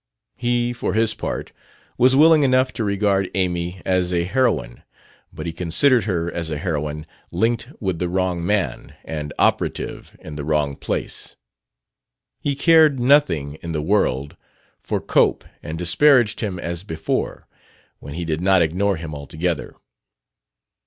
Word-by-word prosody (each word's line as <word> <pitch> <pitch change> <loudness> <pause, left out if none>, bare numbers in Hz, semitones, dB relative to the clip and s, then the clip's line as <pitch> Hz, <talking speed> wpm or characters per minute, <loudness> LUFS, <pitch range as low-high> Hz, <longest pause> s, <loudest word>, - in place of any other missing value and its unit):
He, 120 0 0
for 115 -5 -3
his 110 0 +2
part, - - -5 0.4
was 130 +2 +4
willing 155 +2 +6
enough 130 -1 +2
to 115 - -3
regard 100 -2 +1
Amy 90 -1 -2
as 90 -1 +1
a 85 -1 +1
heroine; 110 - 0 0.5
but - - -8
he 85 - -4
considered 95 - +3
her 85 -4 -1
as 85 -1 -4
a 75 - -3
heroine 75 -1 -3 0.2
linked 115 +7 -1
with 95 -5 -2
the 90 0 -1
wrong 90 -1 -1
man 90 -9 -1
and 75 -2 -5
operative - - -1
in 75 -1 -9
the 75 - -4
wrong 75 -2 0
place. - - -4 1.0
He 140 -1 -1
cared 155 -2 +5
nothing 90 - +2
in 85 -1 -5
the 75 -1 -2
world 75 -7 0 0.4
for - - -2
Cope, - - +2 0.2
and 80 +1 -6
disparaged 115 - +4
him 100 -5 -3
as 85 0 -4
before 80 -6 -3 0.5
when 70 - -9
he 85 0 -4
did 80 0 -2
not 95 -1 +4
ignore 95 +5 0
him 80 -2 -7
altogether. 80 +3 -3
90 Hz, 145 wpm, -21 LUFS, 80-115 Hz, 1.0 s, willing